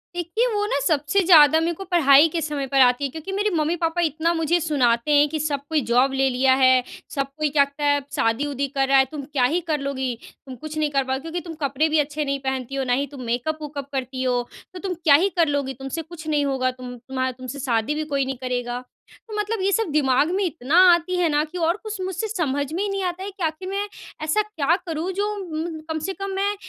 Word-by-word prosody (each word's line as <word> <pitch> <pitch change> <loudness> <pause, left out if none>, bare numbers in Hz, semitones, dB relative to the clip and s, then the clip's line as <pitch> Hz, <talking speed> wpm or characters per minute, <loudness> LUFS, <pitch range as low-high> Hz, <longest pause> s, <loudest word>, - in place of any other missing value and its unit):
देखिए, 355 +8 0
वो 415 0 0
ना 280 - 0
सबसे 300 +4 +1
ज़्यादा 315 -3 +7
मेरे 335 +1 0
को 390 - -8
पढ़ाई 295 -2 +6
के 330 +1 -2
समय 290 -3 -3
पर 275 0 +1
आती 250 +2 +4
है। 275 - 0
क्योंकि 320 +5 -7
मेरे 410 +2 0
मम्मी-पापा 330 +2 0
इतना 325 +1 +1
मुझे 330 +1 +1
सुनाते 270 -4 +1
हैं 290 0 +5
कि 310 - -3
सब 290 -2 -1
कोई 310 -2 +1
जॉब 260 +3 +3
ले 270 0 +2
लिया 260 +1 +3
है, 260 -1 +4 0.3
सब 275 -1 -2
कोई 305 -1 0
कहता 280 0 +1
है 285 0 +3
शादी-उदी 280 +4 0
कर 270 0 +2
रहा 270 0 +5
है 265 - +5
तुम 290 -2 -6
क्या 275 -2 -1
ही 335 +7 +1
कर 300 - +1
लोगी? 265 -3 -2 0.3
तुम 260 - -8
कुछ 310 +5 -8
नहीं 305 -1 +1
कर 275 -1 +1
पाओगी 265 +1 -2
क्योंकि 330 +3 -4
तुम 325 - -5
कपड़े 280 +4 +1
भी 310 0 +2
अच्छे 295 +1 -1
नहीं 275 0 -1
पहनती 265 -1 -3
हो 270 - -1
ना 250 -1 0
ही 285 - -3
तुम 280 -3 -9
मेकअप-मूकअप 285 +3 -3
करती 260 0 -3
हो, 250 -1 +1 0.3
तो 365 - -7
तुम 380 -1 -3
क्या 320 -4 +4
ही 375 +6 +3
कर 330 - +5
लोगी? 280 -2 -1
तुमसे 270 +5 -5
कुछ 320 0 -11
नहीं 295 -2 +1
होगा 260 -2 0
तुम 250 -1 -9
तुम्हा 260 +1 -3
तुमसे 255 +2 -8
शादी 245 +2 0
भी 310 - -2
कोई 280 -3 -1
नहीं 265 -1 -4
करेगा। 245 -1 -3 0.4
तो 435 - -9
मतलब 420 0 -2
ये 390 +1 +1
सब 450 -1 +1
दिमाग 285 +1 +2
में 400 - +1
इतना 320 -3 -1 0.2
आती 345 +2 0
है 355 -1 +2
ना 295 0 +2
कि 360 +4 -9
और 335 +2 +1
कुछ 435 -2 -5
मुझसे 375 +3 -3
समझ 290 -9 -1
में 365 - -1
ही 415 - -1
नहीं 395 0 -2
आता 360 +1 -3
है 400 - -5
कि 380 -2 -7
आख़िर 320 +4 -2
मैं 400 +1 -2 0.4
ऐसा 315 +8 +2
क्या 340 -6 0
करूँ 330 +2 -3
जो 405 +2 -1 0.2
म्म 320 0 -4
कम 315 0 -2
से 385 - -2
कम 395 0 -5
मैं 400 +1 0
295 Hz, 245 wpm, -23 LUFS, 270-340 Hz, 0.4 s, ज़्यादा